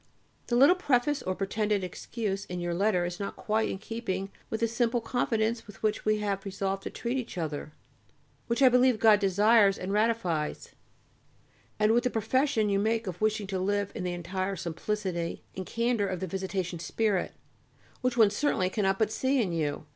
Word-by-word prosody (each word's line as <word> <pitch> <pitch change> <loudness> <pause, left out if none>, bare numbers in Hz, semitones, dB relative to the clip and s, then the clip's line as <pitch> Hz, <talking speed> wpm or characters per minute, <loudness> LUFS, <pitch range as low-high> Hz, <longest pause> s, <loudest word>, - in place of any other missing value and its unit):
The 240 - 0
little 275 +8 +7
preface 290 -4 +1
or 185 - -2
pretended 205 +1 0
excuse 195 +2 -4
in 180 0 -5
your 175 0 -2
letter 185 -1 +2
is 175 +2 -5
not 200 - -4
quite 220 +1 0
in - - -3
keeping 195 -3 -4 0.2
with 220 - -3
the 230 - +3
simple 235 +1 +1
confidence 225 -2 -1
with 210 - -14
which 215 -1 0
we 215 0 +3
have 200 -2 -1
resolved 195 0 -2
to - - -5
treat 245 +3 -2
each 235 - -7
other, 155 -3 -4 0.8
which 235 +4 +1
I 260 - +9
believe 250 -1 +4
God 215 -2 +6
desires 205 +1 +4
and 190 +2 -4
ratifies, 210 -8 0 1.1
and 215 0 +3
with 235 +1 +3
the 250 - +1
profession 230 +1 +1
you 200 -1 +2
make 225 +2 0
of 180 -1 -6
wishing 215 -1 +1
to 190 -1 -3
live 200 +1 0
in 200 - -5
the 180 -1 -2
entire 185 +3 -3
simplicity 175 0 -3
and 185 -1 -5
candour 230 -3 0
of 185 -2 -3
the 190 - -2
Visitation 190 -1 -3
spirit, 200 +2 0 0.7
which 250 -1 0
one 215 -3 +6
certainly 205 -6 0
cannot 195 -2 +1
but 220 0 +1
see 260 +4 +1
in 200 -7 +1
you. 155 -3 -2
205 Hz, 185 wpm, -29 LUFS, 185-230 Hz, 1.1 s, I